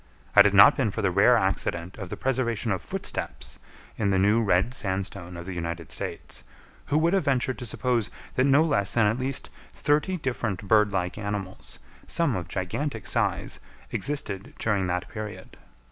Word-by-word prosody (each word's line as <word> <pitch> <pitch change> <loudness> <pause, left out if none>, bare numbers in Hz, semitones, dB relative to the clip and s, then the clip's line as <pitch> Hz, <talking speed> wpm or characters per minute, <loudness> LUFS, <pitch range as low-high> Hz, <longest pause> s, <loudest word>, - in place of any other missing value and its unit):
Had 100 0 +8
it 100 - 0
not 100 - +9
been 130 -6 +1
for 110 +2 -4
the 95 - +2
rare 105 +7 +5
accident 95 -3 -1
of 95 -3 -6
the - - -5
preservation 120 -4 0
of 95 - -1
footsteps - - -5 0.4
in 105 -3 +2
the 95 - +2
new 105 +4 +4
red 100 +3 +2
sandstone 95 -4 -3
of 85 - -7
the 95 - -5
United 85 -2 -5
States, - - -5 0.4
who 145 - +2
would 165 +3 +3
have 195 -6 +2
ventured 130 -2 0
to 125 - -4
suppose 120 -2 0 0.2
that 130 - +2
no 140 +3 +5
less 135 - +1
than 115 -2 +4
at 110 +4 +1
least 130 +1 -2 0.2
thirty 150 +6 +1
different 120 - -3
bird 105 -1 +4
like 90 -1 -2
animals, 100 -2 -4 0.3
some 165 -8 +1
of 85 -2 -4
gigantic 105 - -3
size, - - -1 0.3
existed 105 -9 -2
during 100 -4 0
that 90 0 -2
period? 105 -1 -8
105 Hz, 175 wpm, -26 LUFS, 95-130 Hz, 0.4 s, not